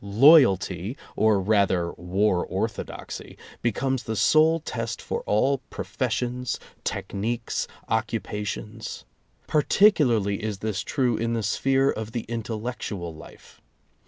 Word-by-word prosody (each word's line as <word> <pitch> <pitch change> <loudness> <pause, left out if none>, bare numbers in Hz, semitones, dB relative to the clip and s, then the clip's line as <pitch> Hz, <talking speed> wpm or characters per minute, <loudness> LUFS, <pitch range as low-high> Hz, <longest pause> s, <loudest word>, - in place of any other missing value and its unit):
"Loyalty," 105 - +5 0.2
or 110 -2 +3
rather 95 -4 +2
war 90 +1 0
orthodoxy, - - -5 0.2
becomes 130 +3 0
the 110 -1 -4
sole 155 +9 +4
test 115 -7 -4
for - - -3
all 135 +6 +2
professions, 125 0 -2 0.2
techniques, 115 +4 -2 0.2
occupa 110 -1 -2
tions. 110 +2 -6 0.4
Particularly 135 - +3
is 105 -2 -3
this 105 -1 -2
true 125 -5 0
in 115 +1 -1
the 115 -1 -1
sphere 135 +6 +2
of 110 +1 -6
the 120 - -1
intellectual 110 -6 -4
life. 80 - -15
110 Hz, 110 wpm, -25 LUFS, 100-125 Hz, 0.4 s, Loyalty